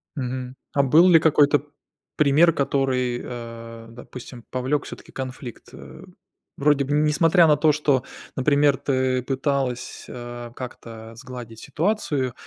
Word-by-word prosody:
Мгм. 130 -1 -4 0.2
А 140 - +3
был 160 +7 +6
ли 165 -2 +7
какой-то 145 -3 +4 0.5
пример, 150 +3 +5
который, 130 -3 0
э, 115 -1 -8
допустим, 120 0 -11
повлёк 130 +3 -1
всё-таки - - -11
конфликт, 130 -2 -7
э? 65 -1 -12 0.5
Вроде 140 -1 +2
бы 145 - -2
несмотря 160 +3 +4
на 150 -2 +5
то, 155 0 +4
что, 145 -3 +1 0.3
например, 140 0 +3
ты 130 -2 0
пыталась, 135 -1 -2
а, 120 -1 -8
как-то 115 -3 -9
сгладить 120 -3 -9
ситуацию, 150 - -1
130 Hz, 125 wpm, -23 LUFS, 120-145 Hz, 0.5 s, ли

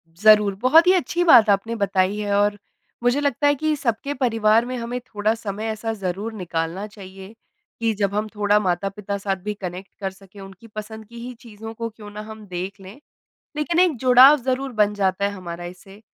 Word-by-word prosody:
ज़रूर, 210 +1 +5
बहुत 315 +7 +5
ही - - +7
अच्छी 350 -1 0
बात 240 -10 +7
आपने 205 +3 +1
बताई 200 -1 0
है 205 -1 -2
और 205 0 +2 0.5
मुझे 245 +3 +2
लगता 285 0 +1
है 290 - +3
कि 310 +2 0
सबके 270 +1 -2
परिवार 225 -3 +2
में 255 +1 -4
हमें 240 +1 -4
थोड़ा 215 -3 -1
समय 215 -1 -5
ऐसा 225 +1 -4
ज़रूर 200 +2 -4
निकालना 175 -1 -4
चाहिए, 195 -1 -12 0.5
कि 230 -1 +1
जब 200 -1 -1
हम 210 +1 -1
थोड़ा 205 0 +3
माता-पिता 195 +2 -2
साथ 195 -1 -2
भी 210 0 -3
कनेक्ट 185 -1 -8
कर 195 -2 -3
सकें। 195 +1 -17
उनकी 195 +3 -13
पसंद 215 +1 -8
की 235 +1 -11
ही 250 - -7
चीज़ों 225 -1 -10
को 230 0 -5
क्यों 215 -2 -12
ना 210 +1 -7
हम 220 -1 -10
देख 185 +2 -6
लें, 195 +8 -12 0.6
लेकिन 330 +3 +1
एक 355 -6 +3
जुड़ाव 255 +4 +7
ज़रूर 265 +1 -2
बन 210 -2 +2
जाता 195 -1 0
है 200 - +1
हमारा 175 -3 -8
इससे। 195 +3 -11
210 Hz, 195 wpm, -22 LUFS, 195-235 Hz, 0.6 s, ही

